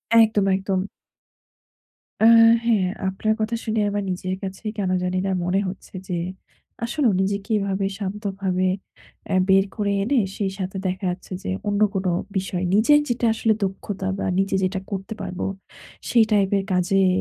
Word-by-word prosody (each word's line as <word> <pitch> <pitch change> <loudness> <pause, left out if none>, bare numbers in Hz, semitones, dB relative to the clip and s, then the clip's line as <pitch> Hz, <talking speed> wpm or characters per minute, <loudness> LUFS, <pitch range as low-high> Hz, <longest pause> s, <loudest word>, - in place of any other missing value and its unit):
একদম, 220 -3 +5
একদম। 195 0 -1 1.4
আ - - +7 0.4
হ্যা, 235 -1 +4 0.3
আপনার 215 +3 0
কথা 225 +2 0
শুনে 220 -1 0
আমার 205 0 -2
নিজের 185 +1 -3
কাছে 195 +2 -6
কেন 195 -3 -1
জানিনা 185 +1 -1
মনে 185 +2 +1
হচ্ছে 190 +2 -8
যে 180 - -2 0.7
আসলেও 240 -1 +1
নিজেকে 200 +3 -2
এভাবে 195 0 -1
শান্তভাবে 195 -2 -2 0.7
এ - - +3
বের 195 0 +5
করে 205 -2 0
এনে 260 +7 +1 0.2
সেই 195 -2 -1
সাথে 190 +1 -3
দেখা 185 +1 -3
যাচ্ছে 180 +1 -9
যে, 200 - -4 0.2
অন্য 205 0 0
কোনো 190 -1 0 0.3
বিষয় 185 -1 -2
নিজের 265 +8 +5
যেটা 240 0 0
আসলে 220 0 +2
দক্ষতা 190 0 -3
বা - - -2
নিজে 195 0 +1
যেটা 190 +1 0
করতে 195 +2 -4
পারবো, 185 -1 -4 0.6
সেই 235 -2 +5
টাইপের 200 -1 +2
কাজেই 185 +1 +3
195 Hz, 150 wpm, -23 LUFS, 190-210 Hz, 1.4 s, আ